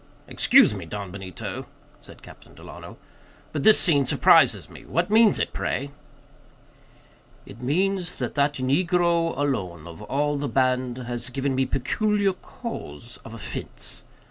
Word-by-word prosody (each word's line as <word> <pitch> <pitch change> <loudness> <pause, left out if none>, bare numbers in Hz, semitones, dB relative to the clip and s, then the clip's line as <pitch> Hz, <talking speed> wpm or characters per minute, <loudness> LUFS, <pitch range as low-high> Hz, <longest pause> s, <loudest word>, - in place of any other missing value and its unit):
"Excuse - - +5
me, 95 -5 -7
Don 100 +1 -6
Benito," 95 -1 -7 0.3
said - - -15
Captain - - -15
Delano, - - -11 0.5
"but 145 - -3
this 215 +8 +7
scene 145 -6 +3
surprises - - +4
me; - - -13
what 175 +4 -1
means 220 -1 +5
it, - - -2
pray?" 140 +1 -3 1.5
"It 110 +4 -13
means 180 +6 0
that - - -4
that 145 0 +1
negro 170 +4 +1
alone, 95 - -2
of 85 -1 -11
all 145 +1 -1
the 140 -1 -3
band, 130 0 0
has 120 0 -5
given 135 +1 -2
me 130 0 +1
peculiar 200 - 0
cause 120 - -9
of 115 - -10
offense. 115 - -7
140 Hz, 140 wpm, -24 LUFS, 120-170 Hz, 1.5 s, this